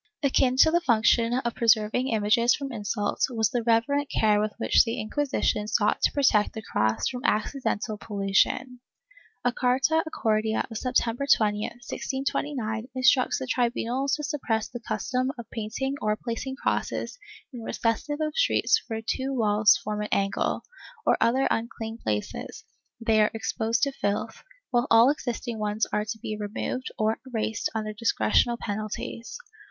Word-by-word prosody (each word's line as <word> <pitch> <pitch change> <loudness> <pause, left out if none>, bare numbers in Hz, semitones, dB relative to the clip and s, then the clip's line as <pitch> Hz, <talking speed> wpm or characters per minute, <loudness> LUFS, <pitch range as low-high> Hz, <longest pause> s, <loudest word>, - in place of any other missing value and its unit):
Akin 260 -2 +3
to 315 +4 +6
the 345 +1 +3
function 230 -3 +3
of 240 -1 -1
preserving 225 +2 +2
images 230 +1 +3
from 275 -1 -6
insult, 205 -2 -2
was 225 -4 0
the 245 - 0
reverent 235 +5 +1
care 210 -1 +3
with 215 0 -1
which 230 - +4
the 230 -1 -3
Inquisition 215 -3 -1
sought 215 -1 +1
to - - +3
protect 245 -7 +2
the 220 - -7
cross 110 - 0
from 250 -1 -4
accidental 215 -4 -1
pollution. 210 +5 0 0.7
A 245 - +4
carta 265 +6 +2
acordada 220 -5 0
of 225 - -4
September 250 +1 0
20, 210 -1 +3 0.3
1629, 265 -4 -3
instructs 255 0 +3
the 260 - -4
tribunals 250 +2 0
to 300 - -6
suppress 255 -7 -1
the 240 - -7
custom 255 +2 -2
of 235 - -8
painting 230 +5 -3
or 210 0 +1
placing 240 +4 -5
crosses 395 - -2 0.3
in 245 - -7
recesses 230 +6 -1
of 305 -1 -1
streets 485 -2 +3
or 225 - -2
where 225 - -5
two 265 +3 -2
walls 210 -3 +4
form 210 0 -3
an 210 - -2
angle, 200 0 0 0.4
or - - +4
other 260 +3 +3
unclean 225 0 -3
places, 105 -1 -4 0.3
where 230 - -12
they 220 -1 +4
are 210 - +3
exposed 225 +1 -1
to 280 - +2
filth, 205 -5 -3 0.3
while 245 +1 +2
all 230 +4 +7
existing 240 -5 -4
ones 210 +1 0
are 210 - +1
to 220 +1 -4
be 215 0 -5
removed 215 +5 -4
or 220 +1 0
erased 225 -2 -2
under 215 -1 -2
dis 230 +1 +1
cretional 110 - +3
penalties. 215 +2 -5
230 Hz, 160 wpm, -26 LUFS, 215-255 Hz, 0.7 s, all